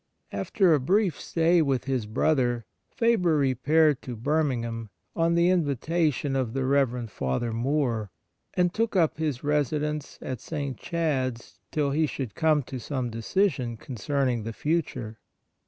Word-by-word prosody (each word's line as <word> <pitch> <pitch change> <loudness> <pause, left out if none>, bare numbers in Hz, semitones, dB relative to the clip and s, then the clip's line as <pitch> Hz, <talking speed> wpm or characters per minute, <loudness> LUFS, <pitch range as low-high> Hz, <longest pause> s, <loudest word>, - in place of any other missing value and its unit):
After 165 - +2
a 150 - +4
brief 185 +6 +1
stay 165 +1 +3
with 135 -4 +1
his 130 -5 -1
brother, 120 -1 +1 0.2
Faber 200 -9 +2
repaired 145 +2 +3
to 125 - -6
Birmingham 120 -4 -1 0.3
on 165 0 +2
the 170 +1 +4
invitation 150 -3 0
of 130 -4 -1
the 135 -1 -1
Rev. 130 -3 +1
Father 105 - -2
Moore, 120 -3 0 0.5
and 180 -1 +2
took 225 -1 0
up 165 -4 +2
his 150 -6 -2
residence 150 0 -1
at 130 -2 -5
St. 140 -4 -4
Chad's 130 -7 -2
till 145 -2 0
he 155 +2 +2
should 130 -7 -5
come 155 +1 +2
to 130 +1 -6
some 125 -1 -3
decision 120 - 0
concerning 130 +1 -1
the 115 +1 -5
future. 130 -5 -2
140 Hz, 140 wpm, -27 LUFS, 120-160 Hz, 0.5 s, a